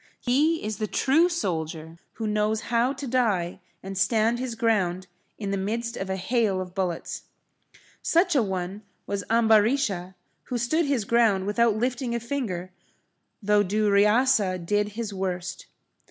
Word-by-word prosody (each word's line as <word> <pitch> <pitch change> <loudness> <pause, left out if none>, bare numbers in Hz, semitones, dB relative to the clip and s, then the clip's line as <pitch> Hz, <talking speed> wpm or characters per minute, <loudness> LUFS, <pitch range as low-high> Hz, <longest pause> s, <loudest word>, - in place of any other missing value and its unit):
He 300 +6 +1
is 215 -1 -4
the 215 - -1
true 315 +11 +3
soldier 165 - -3
who 225 - -5
knows 210 +1 +1
how 235 +3 +3
to 275 0 -6
die 220 -9 0 0.2
and 195 +1 -6
stand 220 +4 +2
his 250 -2 -3
ground 190 -6 +1 0.3
in 200 -3 -4
the 200 - 0
midst 230 +4 -2
of 190 - -5
a 190 - 0
hail 205 0 0
of 180 -1 -6
bullets. 180 -3 -3 0.8
Such 345 0 +2
a 270 - +5
one 190 -1 -3 0.2
was 200 -1 -3
Ambarisha, 220 -4 +2 0.3
who 250 - -3
stood 300 +7 +1
his 260 -7 0
ground 220 -4 +3
without 220 +2 +2
lifting 245 +1 -1
a - - 0
finger 220 -8 -4 0.7
though 210 +1 +4
Duryasa 210 +1 +3
did 205 +2 0
his 220 -2 -4
worst. 185 -1 -4
215 Hz, 150 wpm, -26 LUFS, 190-240 Hz, 0.8 s, a